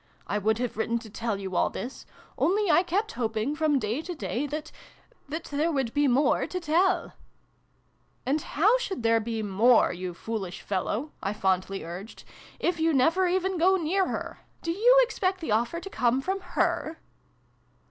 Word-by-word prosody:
I 205 - -1
would 220 +2 +1
have 245 -2 -3
written 230 +1 0
to 225 -2 -9
tell 225 -2 -2
you 190 -2 -5
all - - +3
this: 255 +3 -7 0.3
only 400 0 +2
I 300 - +6
kept 385 +5 -1
hoping 225 +3 -2
from 305 -2 +2
day 230 +3 -1
to 355 +1 -6
day, 230 - -2
that 305 +2 -5 0.6
that 320 +2 -4
there 300 +4 -1
would 265 -6 -1
be 290 0 +3
more 265 +3 +2
to 365 - -3
tell! 355 +3 +1 0.4
" - - -41
" - - -41
And 285 +4 +1
how 420 +15 +3
should 385 - -4
there 230 0 +4
be 225 0 -3
more, 215 +4 +4
you 180 0 -5
foolish 200 -3 -5
fellow," 210 +9 -2
I 195 - -2
fondly 195 -1 0
urged, 180 +6 -8 0.2
" - - -22
if 345 -2 -3
you 320 -1 +2
never 330 +8 +3
even 370 0 0
go 375 +3 +5
near 370 +2 +1
her? - - -5 0.2
Do 335 - -1
you 475 +8 +5
expect 380 -6 -1
the 320 -10 -4
offer 235 +10 +1
to 390 - -8
come 250 +1 +2
from 380 +8 -2
her 350 -3 -1
285 Hz, 190 wpm, -27 LUFS, 220-350 Hz, 0.6 s, I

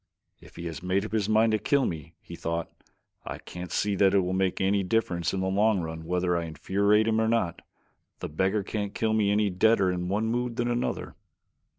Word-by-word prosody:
"If - - -17
he 85 - -7
has 80 -1 -5
made 95 +3 0
up - - -7
his 110 -2 0
mind 110 +1 +4
to 110 - +1
kill 140 +2 +2
me," 80 0 -5
he 85 - -9
thought. 85 0 -3 0.5
"I - - -6
can't 90 -1 -8
see 105 - 0
that 100 0 +4
it 100 - +5
will 90 0 -2
make 95 -1 0
any 100 +1 +2
difference 90 -4 0
in 95 - -2
the 95 - 0
long 100 +2 +2
run 80 -1 -5
whether 90 +1 0
I 85 -1 -1
infuriate 100 +7 +1
him 110 0 +2
or 110 - +2
not. 110 -7 0 0.6
The - - -5
beggar 95 +6 0
can't 100 0 -4
kill 110 -1 0
me 105 -2 +2
any 105 0 +2
deader 95 0 +3
in 90 0 -3
one 105 +3 0
mood 120 +1 -1
than 120 +1 0
another." 120 +1 -2
100 Hz, 220 wpm, -27 LUFS, 90-110 Hz, 0.6 s, it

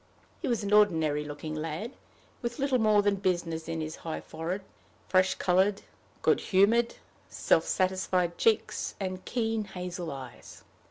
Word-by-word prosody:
He - - -2
was 235 -4 0
an 200 +1 -1
ordinary 160 -8 +4
looking 150 +1 -6
lad, 160 +8 -4 0.5
with 240 -1 -3
little 275 -2 +1
more 215 -2 +4
than 200 -1 +2
business 175 -4 -1
in 165 -1 -2
his 155 0 -5
high 160 -1 -5
forehead, 170 +5 -5 0.4
fresh 185 0 +3
colored, 190 +2 +2 0.4
good - - +4
humored, 225 +5 +3 0.3
self - - +2
satisfied 185 -2 +1
cheeks, 450 -2 +1
and 185 -1 -4
keen 225 -2 -1
hazel 180 -3 -5
eyes. 130 -3 -10
185 Hz, 145 wpm, -29 LUFS, 165-210 Hz, 0.5 s, ordinary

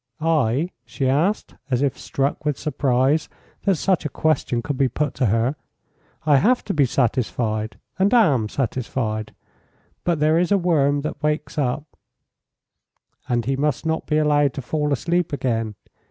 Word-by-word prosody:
"I?" 155 0 +1
she 120 +3 -2
asked, 160 +11 +1 0.2
as 130 0 +1
if 140 - +1
struck 140 +2 -2
with 150 -2 0
surprise 140 0 +1 0.4
that 195 -2 +4
such 185 +2 +1
a 150 - -2
question 145 -7 0
could 145 - -2
be 130 0 +2
put 145 +3 -1
to 130 - +1
her. 115 +7 +1 0.7
"I 145 -2 +5
have 245 - +3
to 200 - -2
be 145 -3 +4
satisfied, 115 -3 -1 0.2
and 195 +2 +3
am 145 - +4
satisfied. 115 -4 -2 0.7
But 170 -3 +1
there 155 +2 +3
is 180 +2 0
a 200 - +5
worm 145 -6 +2
that 150 -1 -5
wakes 150 0 -1
up 140 +1 0 0.8
" - - -40
"And 120 -2 +1
he 135 +2 0
must 145 +1 -1
not 160 0 -1
be 150 - +1
allowed 145 -3 +3
to 135 - -5
fall 150 +3 -1
asleep 170 +5 0
again. 115 -6 -1
145 Hz, 165 wpm, -22 LUFS, 125-155 Hz, 0.8 s, I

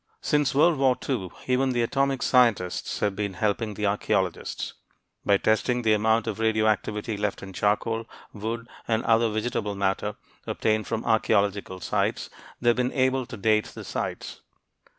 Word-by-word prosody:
Since 150 -2 +1
World 155 +1 +4
War 130 -2 +3
II 110 -10 -1 0.2
even 130 +1 +1
the 120 -1 +1
atomic 135 +2 0
scientists 115 -8 +2
have 100 -2 +1
been 100 -2 -3
helping 105 +2 -1
the 105 - -2
archeologists. 100 +1 -1 0.5
By 100 - +4
testing 120 +4 +1
the 110 -1 +4
amount 110 +2 +2
of 110 -1 -4
radioactivity 110 -1 0
left 105 -1 -2
in 95 -1 -8
charcoal, 110 +4 0 0.3
wood, 115 +2 -4 0.2
or 110 0 +1
other 115 0 +4
vegetable 110 -1 -2
matter 100 +1 -1 0.3
obtained 110 0 0
from 115 0 -3
archeological 100 -3 +1
sites, 75 - -1 0.3
they 120 - +2
have 120 - +3
been 125 0 0
able 130 -1 +1
to - - -8
date 105 +1 +2
the - - -9
sites. - - -5
110 Hz, 155 wpm, -26 LUFS, 105-120 Hz, 0.5 s, World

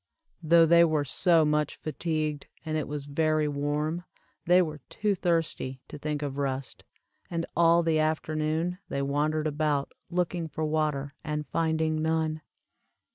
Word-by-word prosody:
Though 165 +1 +6
they 170 +1 +6
were 155 -3 +2
so 165 +3 +3
much 150 -1 +1
fatigued, 155 -2 -3 0.2
and 155 -1 -2
it 155 -3 -1
was 145 -1 -5
very 155 +1 +1
warm, 150 +4 -1 0.4
they 180 +1 +6
were 155 -4 -1
too 210 -1 0
thirsty 165 -7 -1
to 150 - -8
think 150 0 -3
of 140 -1 -4
rest, 135 -1 -3 0.5
and 165 -1 -2
all 170 0 +5
the 160 -1 +2
afternoon 155 +2 -1
they 140 - -1
wandered 150 +2 0
about 150 -2 0 0.2
looking 175 -1 -1
for 155 0 -3
water 150 -2 -1
and 150 0 -3
finding 160 -1 0
none. 160 -1 0
155 Hz, 145 wpm, -28 LUFS, 150-165 Hz, 0.5 s, Though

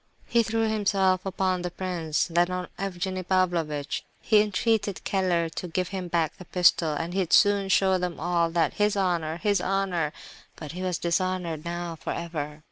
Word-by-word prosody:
He 235 - +3
threw 225 0 0
himself 195 -3 +2
upon 185 -1 0
the 180 - -2
prince, 175 -4 -1
then 175 +1 +2
on 180 0 -3
Evgenie 185 -1 -3
Pavlovitch. 170 -6 0 0.2
He 215 -1 +4
entreated 210 -1 0
Keller 180 -4 +1
to 180 - -5
give 180 +2 -2
him 190 -2 -4
back 165 -3 0
the 185 - -11
pistol, 175 -3 +3
and 170 +3 -3
he'd 185 -3 -1
soon 205 -2 +4
show 190 -1 +3
them 180 -1 -3
all 170 0 +1
that 165 0 +1
"his 210 0 +1
honour—his 175 +1 0
honour,"—but 175 -5 -3
he 180 +2 -6
was 185 -2 -1
"dishonoured, 175 -2 -1
now, 170 -1 -4
for - - -4
ever!" 155 -3 -5
180 Hz, 165 wpm, -26 LUFS, 170-195 Hz, 0.2 s, He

